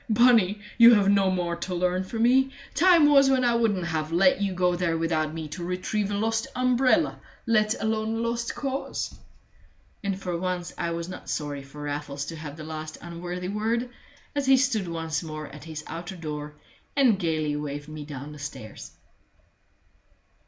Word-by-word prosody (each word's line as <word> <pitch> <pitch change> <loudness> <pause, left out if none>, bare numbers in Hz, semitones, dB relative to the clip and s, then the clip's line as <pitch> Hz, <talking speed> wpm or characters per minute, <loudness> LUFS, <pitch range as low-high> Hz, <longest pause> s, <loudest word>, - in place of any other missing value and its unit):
Bunny, 220 -3 +5 0.2
you 235 0 +10
have 200 -2 +3
no 200 -1 +4
more 175 -2 -1
to 185 - -4
learn 180 +1 +1
from 225 +4 -2
me. 265 +2 +4 0.2
Time 340 -2 +6
was 275 -2 +6
when 260 -1 +3
I 240 - +3
wouldn't 215 -6 +1
have 160 -1 -2
let 185 +3 +4
you 200 -1 +1
go 180 -1 +1
there 170 -2 0
without 160 -2 0
me 160 -1 -5
to 170 +4 -6
retrieve 185 +3 -2
a 205 - -1
lost 225 +1 0
umbrella 255 +4 +2 0.3
let 215 -1 +2
alone 220 0 -1
a - - -2
lost 235 0 -2
cause!" 275 -1 -3 0.9
And 195 -1 -2
for 180 -2 -3
once 180 -1 -3
I 170 - -2
was 170 0 -3
not 185 - -8
sorry 145 -2 -3
for 140 +2 -10
Raffles 145 -1 -4
to 165 - -6
have 155 -1 -8
the 155 - -7
last 155 0 -6
unworthy 175 +1 -5
word, 230 +4 -1 0.4
as 285 -2 -1
he 265 0 +7
stood 245 -8 +1
once 165 -1 -2
more 155 -2 -6
at 150 +2 -11
his 155 -2 -6
outer 175 +3 -6
door 150 -3 -6 0.4
and 250 -8 +4
gayly 155 -4 0
waved 145 0 -5
me 155 -1 -7
down 145 0 -8
the 150 - -10
stairs. 145 -7 -8
180 Hz, 180 wpm, -26 LUFS, 155-225 Hz, 0.9 s, you